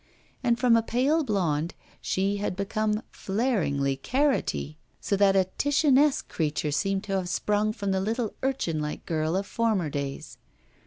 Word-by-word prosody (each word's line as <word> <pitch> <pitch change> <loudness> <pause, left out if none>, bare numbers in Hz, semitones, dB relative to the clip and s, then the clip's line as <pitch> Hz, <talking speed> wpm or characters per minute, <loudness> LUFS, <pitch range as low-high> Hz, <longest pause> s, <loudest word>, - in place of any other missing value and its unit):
And 235 -2 +3
from 245 -2 +4
a 230 - +4
pale 265 +8 +1
blonde 175 - -1 0.3
she 195 +2 0
had 200 -2 -2
become 210 +2 -1
flaringly 175 - 0
carrotty; 255 - 0 0.2
so 200 - 0
that 195 -1 +4
a 190 -1 +4
Titianesque 290 0 +3
creature 150 -1 -1
seemed 195 +7 0
to 195 -2 -1
have 180 -2 -3
sprung 210 +3 +1
from 205 -3 -3
the 190 0 +1
little 225 +2 -1
urchin 260 -12 -1
like 150 0 -5
girl 160 0 -1
of 195 +1 0
former 205 -8 0
days. 140 -1 -5
200 Hz, 155 wpm, -27 LUFS, 165-235 Hz, 0.3 s, from